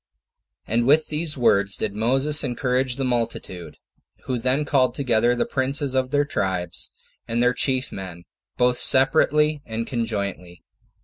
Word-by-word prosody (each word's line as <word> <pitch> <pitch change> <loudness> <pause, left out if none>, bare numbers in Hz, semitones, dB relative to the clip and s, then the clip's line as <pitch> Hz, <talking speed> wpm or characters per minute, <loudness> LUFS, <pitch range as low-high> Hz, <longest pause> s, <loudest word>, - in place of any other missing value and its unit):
3. - - -6
And 120 +1 +1
with 155 +3 +4
these 150 -1 -1
words 100 -5 +2
did 105 -2 -3
Moses 135 +8 +2
encourage 125 0 -1
the 135 - -3
multitude, 115 -8 -3 0.5
who 125 -2 -3
then 130 +5 0
called 130 -4 +1
together 120 -3 +1
the - - 0
princes 135 +1 -1
of 130 -1 0
their 145 +1 +1
tribes, 90 -9 -3 0.4
and 115 +1 0
their 125 0 +3
chief 130 0 0
men, 90 -3 -8 0.3
both 125 0 +2
separately 150 +2 +3
and 115 0 -4
conjointly. 100 -7 -4
125 Hz, 145 wpm, -23 LUFS, 110-135 Hz, 0.5 s, with